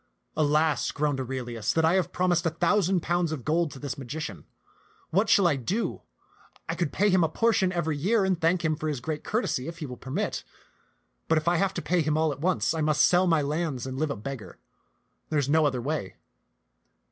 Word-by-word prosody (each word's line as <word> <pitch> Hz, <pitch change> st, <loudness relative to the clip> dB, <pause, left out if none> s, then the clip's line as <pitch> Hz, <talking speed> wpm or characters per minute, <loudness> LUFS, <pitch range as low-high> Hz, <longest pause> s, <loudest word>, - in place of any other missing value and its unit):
" -, -, -46 dB
Alas," 155 Hz, 0 st, +2 dB
groaned 145 Hz, -2 st, -1 dB
Aurelius, 120 Hz, -4 st, -3 dB
"that 160 Hz, 0 st, +2 dB
I 165 Hz, -, +4 dB
have 185 Hz, -2 st, +1 dB
promised 175 Hz, -2 st, +1 dB
a -, -, +3 dB
thousand 180 Hz, +2 st, +2 dB
pounds 175 Hz, -1 st, 0 dB
of 145 Hz, -7 st, -5 dB
gold 165 Hz, +1 st, +1 dB
to 140 Hz, -, -11 dB
this 140 Hz, -1 st, -5 dB
magician. 130 Hz, -, -6 dB, 0.7 s
What 195 Hz, +6 st, +2 dB
shall 205 Hz, -5 st, +5 dB
I 160 Hz, -5 st, +3 dB
do? 190 Hz, -, -2 dB, 0.7 s
I -, -, -1 dB
could 170 Hz, -5 st, -1 dB
pay 205 Hz, +1 st, +2 dB
him 180 Hz, -2 st, +4 dB
a 160 Hz, -, +2 dB
portion 195 Hz, 0 st, +2 dB
every 165 Hz, -4 st, -1 dB
year 195 Hz, +8 st, +2 dB
and 185 Hz, -3 st, 0 dB
thank 170 Hz, +1 st, +2 dB
him 155 Hz, -1 st, +2 dB
for 155 Hz, -, -4 dB
his 145 Hz, -4 st, -2 dB
great 150 Hz, +4 st, -4 dB
cour 220 Hz, +3 st, 0 dB
tesy, 125 Hz, -, -2 dB
if 165 Hz, 0 st, -6 dB
he 160 Hz, -, -5 dB
will 125 Hz, -2 st, -7 dB
permit; 130 Hz, -, -3 dB, 0.8 s
but 160 Hz, -, +3 dB
if 155 Hz, -, -2 dB
I 175 Hz, 0 st, +3 dB
have 195 Hz, +2 st, 0 dB
to -, -, -3 dB
pay 175 Hz, +3 st, +2 dB
him 155 Hz, 0 st, 0 dB
all 160 Hz, -1 st, +2 dB
at 140 Hz, -, -7 dB
once, 180 Hz, -1 st, +1 dB
I 160 Hz, -, -2 dB
must 150 Hz, -1 st, +4 dB
sell 180 Hz, +1 st, +4 dB
my 160 Hz, -3 st, +3 dB
lands 150 Hz, -3 st, -2 dB
and 130 Hz, 0 st, -5 dB
live 155 Hz, 0 st, 0 dB
a 140 Hz, -, -2 dB
beggar; 120 Hz, +2 st, -7 dB, 0.7 s
there 155 Hz, -, 0 dB
is 140 Hz, -2 st, +1 dB
no 155 Hz, 0 st, +4 dB
other 130 Hz, -3 st, -1 dB
way. 140 Hz, -9 st, -3 dB
160 Hz, 225 wpm, -27 LUFS, 145-175 Hz, 0.8 s, shall